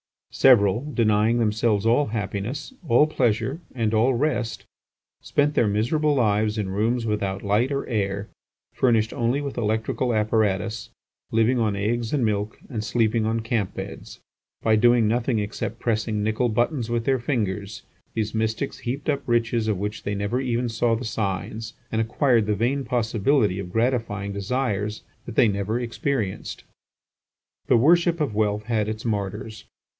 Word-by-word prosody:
Several, 120 +1 +4
denying 110 0 +3
themselves 110 -1 +1
all 120 +6 +3
happiness, 110 - -4
all 120 +5 +5
pleasure, 125 -1 0 0.2
and 115 -3 0
all 115 +4 +3
rest, 115 -7 -1 0.6
spent 145 +1 +1
their 120 - +3
miserable 145 +9 +1
lives 110 -3 +1
in 105 -3 -2
rooms 115 +5 0
without 100 -3 -2
light 105 +5 +2
or 140 0 -1
air, 100 -3 -2 0.4
furnished 115 -3 +2
only 120 +4 0
with 140 -3 -5
electrical 110 +2 0
apparatus, 110 0 0 0.4
living 115 +3 +3
on 110 -3 +1
eggs 115 +4 -1
and 135 -5 +2
milk, 105 0 -1
and 110 -6 -3
sleeping 115 -1 +1
on 115 +1 0
camp 110 -4 -2
beds. - - -8 0.4
By 110 -1 +4
doing 120 +1 +4
nothing 120 +2 +1
except 105 +2 -3
pressing 110 -2 -1
nickel 110 +3 +1
buttons 120 +2 0
with 120 -1 0
their 135 +1 +1
fingers, 110 -4 -2 0.3
these 110 -1 -2
mystics 110 +4 -2
heaped 140 +5 -4
up 140 -2 +1
riches 115 -1 +1
of 105 -3 +1
which 105 +2 -4
they 105 - -3
never 100 +5 -1
even 125 -2 -1
saw 115 0 +1
the 120 +3 -5
signs, 110 +1 -3 0.2
and 110 - 0
acquired 115 -1 +2
the 105 - +1
vain 130 +6 0
possibility 115 -2 +1
of 90 -2 -6
gratifying 115 -4 0
desires 105 0 -2 0.2
that 115 - -8
they 115 - +5
never 100 +3 -1
experienced. 120 - -3 1.0
The 120 - +5
worship 170 +6 +4
of 140 -7 0
wealth 105 0 0
had 110 -2 0
its 110 +1 -5
martyrs. 105 0 -3
115 Hz, 155 wpm, -24 LUFS, 105-120 Hz, 1.0 s, all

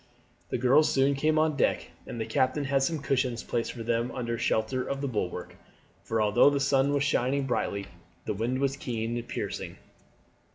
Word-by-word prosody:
The - - -1
girls 130 +5 +4
soon 135 +1 +3
came 155 +3 +1
on 155 -1 +2
deck, 140 - 0 0.2
and 120 - -6
the 110 - -1
captain 130 +6 +1
had 135 0 +1
some 150 +1 -1
cushions 125 -3 0
placed 115 -1 -2
for 115 - -7
them 115 +1 0
under 120 -2 -3
shelter 115 +3 0
of 140 - -3
the 140 - -2
bulwark; 105 -8 -3 0.5
for 110 +3 -2
although 105 +5 +5
the 140 -1 0
sun 135 0 +2
was 140 -1 +1
shining 140 -1 +1
brightly 100 -5 -1 0.4
the - - -1
wind 115 +5 -1
was 135 0 0
keen 115 -3 -3
and 120 0 -4
piercing. - - -4
130 Hz, 190 wpm, -28 LUFS, 115-140 Hz, 0.5 s, although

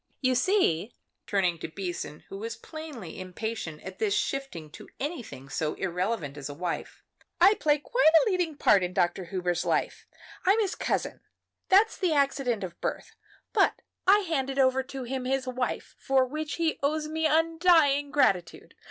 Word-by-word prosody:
"You 255 -1 +2
see," 250 - +1 0.3
turning 180 -4 +1
to - - -4
Beason, 175 -3 -5
who 195 - -7
was 230 +2 -4
plainly 275 - -9
impatient 185 -3 -5
at 185 0 -9
this 205 -2 +1
shifting 225 - -3
to - - -12
anything 260 - -5
so 150 +3 -2
irrelevant 180 -5 -2
as 145 0 -6
a 145 - -7
wife, 175 +2 -5 0.4
"I 400 - +7
play 300 -7 +2
quite 315 +5 +3 0.2
a - - +2
leading 350 -5 -1
part 200 - +5
in 180 0 -2
Dr. 175 +1 +1
Hubers' 175 -1 -1
life. - - -1 0.4
I'm 395 +4 +4
his 410 -3 0
cousin - - -2 0.5
that's 410 +4 +5
the 360 -5 +2
accident 275 -6 +1
of 175 -2 -7
birth; - - -4 0.4
but - - +3 0.3
I 410 +2 +7
handed 275 -7 -2
over 265 -1 +3
to 265 0 -7
him 255 +1 -4
his 265 0 0
wife, 255 -1 -3
for 265 -1 +2
which 305 +3 -4
he 330 -2 0
owes 305 +2 0
me 320 +1 0
undying 320 -3 +3
gratitude. 195 -12 +1
260 Hz, 165 wpm, -28 LUFS, -, 0.5 s, I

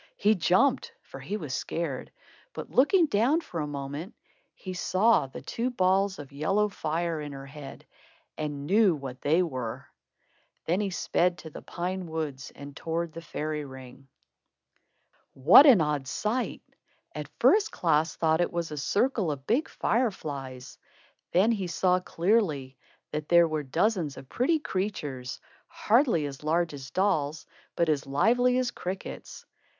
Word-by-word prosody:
He 210 +2 +4
jumped, 220 - +2
for - - -11
he 210 - -4
was 150 -9 -6
scared; 150 -2 -3 0.4
but - - -7
looking 335 +7 +5
down, 255 +5 +2
for 175 - -6
a 150 - -2
moment, 145 - -6 0.4
he 185 - -7
saw 185 0 +2
the 130 - -10
two 240 +2 -2
balls 190 -3 +1
of 145 -2 -10
yellow 195 +9 +1
fire 165 -3 -2
in 145 -1 -6
her 135 0 -8
head 140 0 -10 0.5
and 145 -2 -4
knew 195 +1 +4
what 135 -3 -8
they 160 +5 +3
were. 130 -9 -5 0.8
Then 175 +5 +1
he 200 - -1
sped 180 -1 0
to 160 - -10
the - - -9
pine 180 +1 -4
woods 150 -5 -4
and 140 0 -10
towards 165 0 -3
the 165 - -7
fairy 155 -1 -4
ring. 130 -1 -12 1.3
What 170 - +8
an 235 - +7
odd 150 -3 -1
sight! 220 - -2 0.5
At - - -6
first 425 0 +4
Klaas 160 -1 +1
thought 160 0 +2
it 175 - 0
was 170 -2 -3
a 150 - -5
circle 205 - +1
of 135 -2 -6
big 255 - +1
fire 240 +2 +1
flies. 135 -8 -8 0.5
Then 200 +6 +4
he 195 -5 -1
saw 180 +1 +2
clearly 170 - 0 0.4
that 150 0 -4
there 170 -1 +6
were 155 -1 -2
dozens 165 - 0
of 135 - -10
pretty 295 +7 +2
creatures, 170 - -4 0.3
hardly 225 - +2
as 140 0 -7
large 165 +1 +1
as 135 -1 -8
dolls, 160 -6 0 0.3
but 170 - +2
as 145 -3 0
lively 240 - +3
as 255 -1 0
crickets. 185 +2 -7
170 Hz, 155 wpm, -28 LUFS, 145-205 Hz, 1.3 s, What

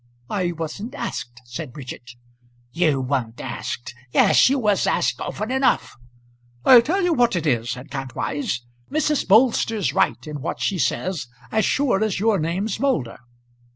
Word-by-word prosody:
"I 185 -4 0
wasn't 170 - -6
asked," 120 - -5
said 125 +2 -7
Bridget. 125 -3 -9 0.6
"You 155 -4 +2
weren't 125 -3 -2
asked! 120 - -5 0.2
Yes, - - +5
you 275 - +2
was 210 -6 +2
asked - - +1
often 215 +3 -4
enough." 265 0 +1 0.7
"I'll 250 -2 +9
tell 365 +10 0
you 355 -1 +3
what 240 -6 +3
it 170 -2 -1
is," 120 -5 +1
said 125 +3 -6
Kantwise, 135 -1 -3 0.3
"Mrs. 300 -2 +1
Bolster's 220 -1 +3
right - - +1
in 150 -2 -6
what 160 - -4
she 195 -3 -1
says 175 -4 -1 0.2
as 220 -1 +2
sure 250 -8 +2
as 215 -4 -1
your 215 -1 +2
name's 185 +6 -2
Moulder." 160 - 0
180 Hz, 155 wpm, -22 LUFS, -, 0.7 s, I'll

